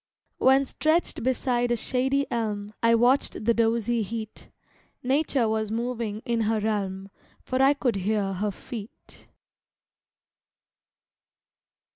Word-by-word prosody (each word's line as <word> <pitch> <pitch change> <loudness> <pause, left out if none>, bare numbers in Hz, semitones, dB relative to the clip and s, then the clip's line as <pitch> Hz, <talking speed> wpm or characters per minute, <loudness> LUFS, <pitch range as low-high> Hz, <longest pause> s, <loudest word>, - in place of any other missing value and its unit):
When 265 +1 +5
stretched 315 +5 0
beside 245 -1 0
a 240 - +2
shady 265 +4 0
elm 210 -3 -2
I 230 0 +5
watched 245 -1 +2
the 235 - +4
dozy 230 0 +1
heat, 220 +1 -6 0.5
Nature 270 -2 +1
was 220 -1 -1
moving 230 -2 -3
in 235 -2 0
her 220 0 +1
realm, 195 -2 -2 0.3
For 255 0 -1
I 275 +2 +5
could 245 -7 0
hear 195 0 0
her 205 +3 -1
feet. 215 +2 -10
230 Hz, 115 wpm, -26 LUFS, 215-255 Hz, 0.5 s, When